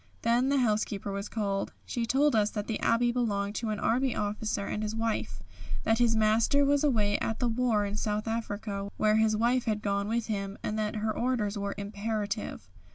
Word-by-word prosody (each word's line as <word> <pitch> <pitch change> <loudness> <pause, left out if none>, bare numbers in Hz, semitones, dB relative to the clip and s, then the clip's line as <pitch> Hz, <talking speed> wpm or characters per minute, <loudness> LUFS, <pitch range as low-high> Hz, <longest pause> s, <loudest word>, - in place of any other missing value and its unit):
Then 240 +3 +3
the 280 - +3
housekeeper 210 -4 0
was 200 +1 -4
called. 200 -3 -2
She 235 -1 -2
told 275 +2 +3
us 210 -1 +3
that 210 -2 -4
the 225 - -3
Abbey 240 +1 +2
belonged 205 -5 -1
to 230 - -2
an 210 -1 -2
Army 255 +2 +1
officer 210 0 -2
and 210 - -3
his 215 0 -2
wife, 225 0 -2 0.4
that 225 +1 +2
her 230 -2 +3
master 220 +6 +3
was 285 +1 +3
away 215 -8 +2
at 225 - -1
the 245 - 0
war 225 -3 +1
in 200 0 -3
South 210 0 -1
Africa 205 -3 -3
where 215 0 +3
his 220 -1 +3
wife 240 +3 +2
had 215 -1 -1
gone 200 0 0
with 230 +1 0
him, 200 -2 -3
and 215 +1 -2
that 215 +1 -1
her 215 0 -1
orders 235 -4 0
were 200 -1 -3
imperative. 210 +1 -3
215 Hz, 200 wpm, -29 LUFS, 205-235 Hz, 0.4 s, Then